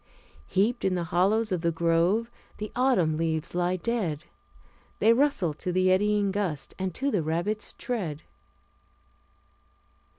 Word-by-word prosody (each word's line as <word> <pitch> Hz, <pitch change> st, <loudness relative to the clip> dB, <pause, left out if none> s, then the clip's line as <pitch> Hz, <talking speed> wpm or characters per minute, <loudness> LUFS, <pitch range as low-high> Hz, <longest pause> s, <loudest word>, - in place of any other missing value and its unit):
Heaped 215 Hz, +6 st, +1 dB
in 190 Hz, -1 st, +1 dB
the 175 Hz, -, -1 dB
hollows 195 Hz, +6 st, +1 dB
of 180 Hz, -3 st, 0 dB
the 170 Hz, -, +1 dB
grove, 170 Hz, +7 st, +1 dB, 0.3 s
the 210 Hz, 0 st, -5 dB
autumn 235 Hz, -12 st, +2 dB
leaves 160 Hz, 0 st, -2 dB
lie 175 Hz, +1 st, +1 dB
dead; 185 Hz, -7 st, -2 dB, 0.7 s
They 225 Hz, -, +5 dB
rustle 235 Hz, -, +2 dB
to 180 Hz, +4 st, -4 dB
the 185 Hz, +1 st, +3 dB
eddying 205 Hz, +1 st, +2 dB
gust, 185 Hz, -8 st, -3 dB
and 190 Hz, 0 st, -1 dB
to 280 Hz, +1 st, 0 dB
the 200 Hz, -, +1 dB
rabbit's 170 Hz, +7 st, -2 dB
tread." 180 Hz, -, -4 dB
185 Hz, 135 wpm, -27 LUFS, 170-215 Hz, 0.7 s, They